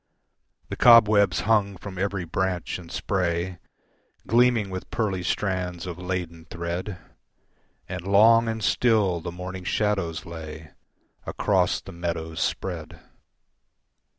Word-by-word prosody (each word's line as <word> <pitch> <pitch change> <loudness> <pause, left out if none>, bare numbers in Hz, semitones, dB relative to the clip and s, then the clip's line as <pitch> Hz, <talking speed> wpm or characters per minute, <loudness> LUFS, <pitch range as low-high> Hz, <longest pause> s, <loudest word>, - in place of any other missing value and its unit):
The - - -4
cobwebs 110 -4 +6
hung 100 -3 +1
from 95 -1 -8
every 95 -2 -1
branch 90 +1 -2
and 85 -2 -12
spray 90 -2 -1 0.7
Gleaming 115 -2 +3
with 95 0 -6
pearly 100 -5 -1
strands 90 -3 -2
of 90 -1 -6
laden 90 -3 -4
thread, 85 +3 -5 0.9
And 90 0 -6
long 115 +4 +6
and 110 -1 -3
still 105 -9 +2
the 85 - -5
morning 90 +1 -7
shadows 95 -5 -1
lay 80 -2 -9 0.6
Across 95 -3 +1
the - - -11
meadows 85 -2 -4
spread. - - -3
95 Hz, 115 wpm, -25 LUFS, 85-105 Hz, 0.9 s, cobwebs